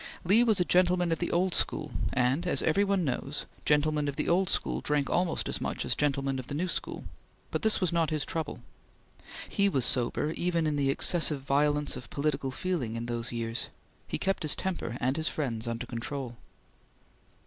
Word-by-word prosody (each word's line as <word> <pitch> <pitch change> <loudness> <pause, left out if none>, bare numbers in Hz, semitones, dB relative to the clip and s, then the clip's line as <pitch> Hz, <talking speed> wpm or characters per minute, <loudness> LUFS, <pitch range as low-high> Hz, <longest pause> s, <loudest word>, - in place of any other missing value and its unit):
Lee 205 +7 +5
was 220 -5 +3
a 180 - +2
gentleman 180 -1 +3
of 165 - 0
the 175 - -1
old 180 +1 +1
school, - - 0 0.2
and, 130 +8 +1
as - - +2
every 180 +6 +3
one 195 -3 +1
knows, 135 +2 -3 0.2
gentlemen 150 0 +2
of 140 - -2
the - - -2
old 185 +2 +3
school - - 0
drank 145 -1 0
almost 180 -1 +1
as - - -2
much - - -2
as - - +2
gentlemen 140 -2 0
of 130 - -7
the 145 - -4
new 175 +5 -1
school; 170 - -3 0.5
but - - -1
this 220 -1 +3
was 180 -3 0
not 165 -2 +2
his 155 -3 -1
trouble. 155 -7 -4 0.8
He 200 0 +2
was 135 -9 +2
sober 130 +4 +3
even 170 -1 0
in 150 -1 0
the 140 -1 +1
excessive 150 0 +3
violence 145 +1 +1
of 125 - -9
political 140 -2 -1
feeling 135 -6 -2
in 115 0 -4
those 120 0 -3
years; 115 -1 -3 0.4
he - - -2
kept 195 0 -1
his 155 - +2
temper 170 -11 -3
and 130 +4 0
his 160 0 0
friends 120 -6 -3
under 115 +1 -3
control. 120 +1 -5
150 Hz, 195 wpm, -29 LUFS, 130-175 Hz, 0.8 s, Lee